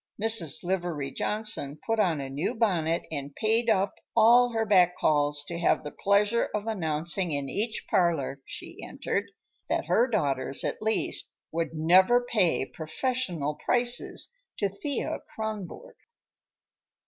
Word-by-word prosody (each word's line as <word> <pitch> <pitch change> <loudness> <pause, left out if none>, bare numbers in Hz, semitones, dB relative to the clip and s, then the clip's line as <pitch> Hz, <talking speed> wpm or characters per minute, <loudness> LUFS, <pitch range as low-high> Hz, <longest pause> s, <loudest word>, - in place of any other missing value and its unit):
Mrs. 210 -9 +3
Livery 175 -6 -2
Johnson 210 -10 -1
put 225 -1 0
on 175 -7 +2
a 135 - -4
new 140 +5 -3
bonnet 170 -7 +1
and 140 -2 -5
paid 225 +2 +1
up 195 -2 +2 0.2
all 240 +2 +6
her 225 -1 0
back 180 -4 +4
calls 145 -1 +1
to 170 +3 -6
have 170 - +2
the 150 - -6
pleasure 205 +3 +2
of 210 0 -3
announcing 170 -3 -1
in 140 -1 -2
each 215 - -2
parlor 160 -6 0
she - - -9
entered - - -3 0.4
that - - 0
her 225 +8 +3
daughters, 140 - 0
at - - -3
least, 220 +1 -1 0.2
would 165 0 -3
"never 185 +9 +5
pay 190 - +1
professional 165 - -2
prices 245 - +1 0.2
to 200 - 0
Thea 270 +8 -3 0.2
Kronborg." 220 - -6
185 Hz, 135 wpm, -27 LUFS, 155-220 Hz, 0.4 s, all